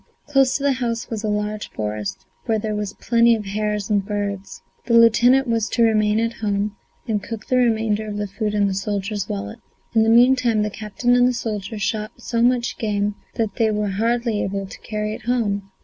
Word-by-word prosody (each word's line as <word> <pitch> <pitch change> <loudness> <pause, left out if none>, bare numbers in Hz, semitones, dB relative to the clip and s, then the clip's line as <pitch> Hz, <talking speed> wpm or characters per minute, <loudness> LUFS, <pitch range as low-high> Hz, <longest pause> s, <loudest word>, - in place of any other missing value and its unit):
Close 270 -2 +3
to 280 - -7
the 280 - +3
house 240 -3 -2
was 220 -1 -3
a - - -1
large 210 0 -2
forest 105 -1 -4 0.2
where 225 -2 +2
there 215 0 -3
were 210 0 -2
plenty 235 0 +4
of 215 -2 -5
hares 210 0 -2
and 205 -2 +1
birds. 200 -2 -4 0.2
The 235 - +3
lieutenant 240 +4 +5
was 230 -1 0
to 235 - +2
remain 215 -1 +3
at 230 0 0
home 205 -1 -1 0.3
and 215 -3 0
cook 220 +2 -7
the 255 - +1
remainder 220 -3 +1
of 205 -1 -4
the 205 - -1
food 210 +1 -3
in 205 -1 +3
the 195 - 0
soldier's 200 +1 -3
wallet. 100 0 -5 0.3
In 225 - +4
the 220 - +3
meantime 240 -2 +4
the 210 - -2
captain 220 +4 0
and 245 0 +5
the 250 - +1
soldier 220 -3 -4
shot 215 +1 -2
so 230 -1 -2
much 240 0 +1
game 205 -1 0 0.2
that 220 -3 -2
they 225 -1 +3
were 210 -1 -1
hardly 230 +2 0
able 195 0 -2
to 190 - -11
carry 215 -1 -3
it 215 - -9
home. 205 -5 0
215 Hz, 210 wpm, -22 LUFS, 205-230 Hz, 0.3 s, lieutenant